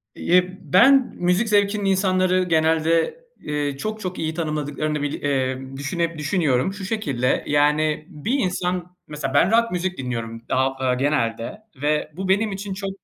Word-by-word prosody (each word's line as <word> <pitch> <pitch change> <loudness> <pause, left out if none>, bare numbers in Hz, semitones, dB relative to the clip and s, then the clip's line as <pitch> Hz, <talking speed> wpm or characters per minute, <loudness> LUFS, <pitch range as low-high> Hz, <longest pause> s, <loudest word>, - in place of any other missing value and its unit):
Eee, 180 +1 +2
ben 265 +7 +5
müzik 180 +6 +1
zevkinin 205 0 +2
insanları 185 -1 +2
genelde, 165 - +2 0.2
eee, 145 -2 -2
çok, 215 +8 -4
çok 185 -3 -5
iyi 160 0 -2
tanımladıklarını 150 -2 -2
bir 145 0 -3
eee, 130 -2 0 0.2
düşüne 165 +4 -2
düşünüyorum. 150 -1 +1
Şu 200 -1 -7
şekilde, 140 - 0
yani, 150 +1 +2
bir 195 - -2
insan, 180 -2 -2
mesela, 150 -3 -4
ben 170 +7 +4
rock 230 +1 +3
müzik 180 +1 -2
dinliyorum, 115 -3 -4
ha 130 +1 +1
aaa, 130 -1 +1
genelde 125 - -1 0.2
ve 150 +1 0
bu 190 +1 -4
benim 205 +3 +2
için 195 0 -5
çok 195 +1 -4
165 Hz, 150 wpm, -22 LUFS, 145-190 Hz, 0.2 s, ben